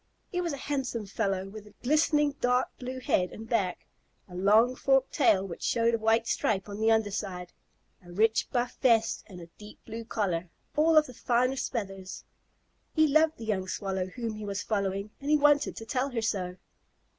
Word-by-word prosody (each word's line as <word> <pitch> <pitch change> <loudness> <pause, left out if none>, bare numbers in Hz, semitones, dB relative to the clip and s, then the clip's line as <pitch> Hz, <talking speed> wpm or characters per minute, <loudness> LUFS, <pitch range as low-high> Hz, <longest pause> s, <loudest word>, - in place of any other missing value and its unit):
He 360 - -1
was 340 -2 -2
a 280 - -4
handsome 265 -5 -3
fellow, 195 -1 -2
with 210 +1 -10
a - - -18
glistening 295 +1 +3
dark 250 +1 +2
blue 255 +1 -5
head 180 -7 +1
and 225 +1 -9
back, 200 -7 -1 0.4
a 180 - -14
long 210 +7 +4
forked 270 0 +2
tail 220 - +3
which 170 - -8
showed 230 0 +2
a 230 - +1
white 225 +1 +2
stripe 205 -4 0
on 205 0 -7
the 220 +1 +3
under 220 -2 +2
side, 180 -3 -5 0.5
a 175 - -13
rich 220 +5 +2
buff 245 -1 -1
vest, 225 -3 +3
and 185 -4 -11
a 170 - -9
deep 210 0 -12
blue 230 +1 -6
collar, 185 -7 -2 0.3
all 315 +1 +4
of 305 - +7
the 255 - -10
finest 250 +3 0
feathers. 195 -4 -5 0.7
He 315 -1 +5
loved 310 +2 +3
the 225 - -8
young 190 -4 -1
Swallow 190 -1 -2
whom 230 +3 -5
he 215 0 -7
was 200 -1 -3
following, 200 -1 -2
and 280 - -5
he 305 - +5
wanted 290 0 +3
to 225 - -8
tell 255 +5 -1
her 240 -4 -2
so. 185 -4 -2
225 Hz, 195 wpm, -29 LUFS, 195-255 Hz, 0.7 s, of